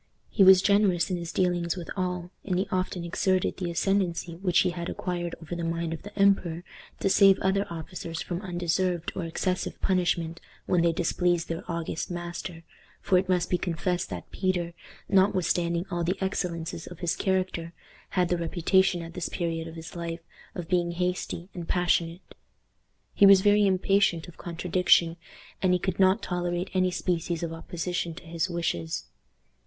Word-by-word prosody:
He 200 - +4
was 190 -1 +8
generous 200 -3 +3
in 180 - 0
his 170 -1 -5
dealings 175 -2 +1
with 175 - -6
all, 180 -2 -2
and 185 -3 -1
he 190 - 0
often 185 -1 -1
exerted 185 +2 0
the 180 -2 -3
ascendency 175 -1 0
which 180 -1 +1
he 180 - +1
had 175 0 -5
acquired 175 -1 -3
over 165 +1 -6
the 170 - -4
mind 165 0 -2
of 160 - -6
the 205 0 -11
emperor 190 -4 +3 0.4
to - - +2
save 195 0 +6
other 195 +1 +1
officers 165 0 -6
from 175 0 -4
undeserved 175 -1 -1
or 180 - -3
excessive 180 +2 -2
punishment 170 -3 0 0.2
when 180 - +2
they 170 0 +4
displeased 175 0 0
their 165 +2 -3
august 165 -1 -3
master; 175 -1 -6 0.4
for 185 - +3
it 185 - -4
must 180 -1 +2
be 180 - +2
confessed 175 +1 -1
that - - -7
Peter, 180 -3 -1 0.3
notwithstanding 180 -3 +2
all 175 -1 -1
the 180 +3 0
excellences 170 -4 -3
of 175 - -9
his 175 -2 0
character, 185 -3 -1 0.4
had 180 -2 +1
the 175 - +1
reputation 175 +2 +2
at 165 0 -9
this 170 - -3
period 165 -2 -2
of 165 - -9
his 165 +1 -9
life 170 -1 -4 0.3
of 175 -3 -5
being 175 -1 +1
hasty 180 0 -2
and 170 -2 -6
passionate. 175 -1 0 0.8
He 200 - +6
was 195 -1 +8
very 205 0 +5
impatient 185 -2 +2
of 175 - -12
contradiction, 175 -1 +2 0.4
and 185 -1 +3
he - - +4
could 185 0 -3
not 190 +3 +4
tolerate 175 0 -2
any 185 -1 +3
species 175 -2 -2
of 165 -1 -3
opposition 170 0 -3
to - - -11
his 170 +2 -2
wishes. 125 - -2
175 Hz, 170 wpm, -27 LUFS, 170-185 Hz, 0.8 s, was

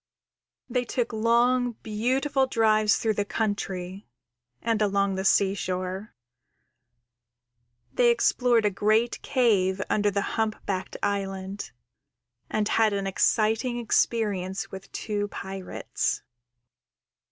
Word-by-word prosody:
_ - - -8
_They 250 -1 +1
took 240 -2 -2
long, 240 +2 +2
beautiful 265 +6 0
drives 215 -4 +3
through 220 -1 0
the 205 - 0
country 200 -3 -3 0.5
and 225 -2 0
along 200 -1 +2
the 190 0 -2
seashore. 190 0 0 1.8
They 240 -1 +4
explored 235 -1 +3
a 205 - +3
great 215 +4 +1
cave 200 -7 +2
under 210 -1 +2
the 200 0 -1 0.2
Humpbacked 205 -3 -3
Island, 195 0 -3 0.8
and 215 -1 0
had 220 -2 +3
an 200 -1 -1
exciting 220 +5 +1
experience 205 -5 0
with 190 0 -9
two 205 -1 -2
pirates. 190 -2 -4
210 Hz, 105 wpm, -26 LUFS, 195-230 Hz, 1.8 s, They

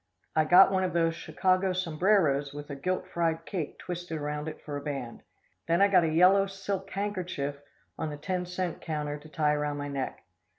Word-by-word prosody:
I 155 - +4
got 180 +4 +7
one 190 -1 +2
of 180 -3 -1
those 165 -1 +2
Chicago 185 +3 +1
sombreros 165 -5 +2
with 145 0 -7
a - - -4
gilt 185 +6 -2
fried 165 -2 -1
cake 170 -7 -4
twisted 175 -2 -5
around 150 0 -3
it 155 - -6
for 145 - -5
a 145 - -3
band. 135 -5 -5 0.5
Then 170 +1 +3
I 200 +1 +5
got 185 -3 +5
a 165 - +2
yellow 185 +5 +5
silk 195 0 -4
handkerchief 185 -9 -3 0.4
on 160 - -2
the 150 - -6
ten 180 +3 -3
cent 180 -1 -3
counter 150 -2 -3
to 155 +1 -14
tie 150 -1 +1
around 150 0 -1
my 145 0 -4
neck. 135 -2 -4
165 Hz, 200 wpm, -29 LUFS, 150-185 Hz, 0.5 s, got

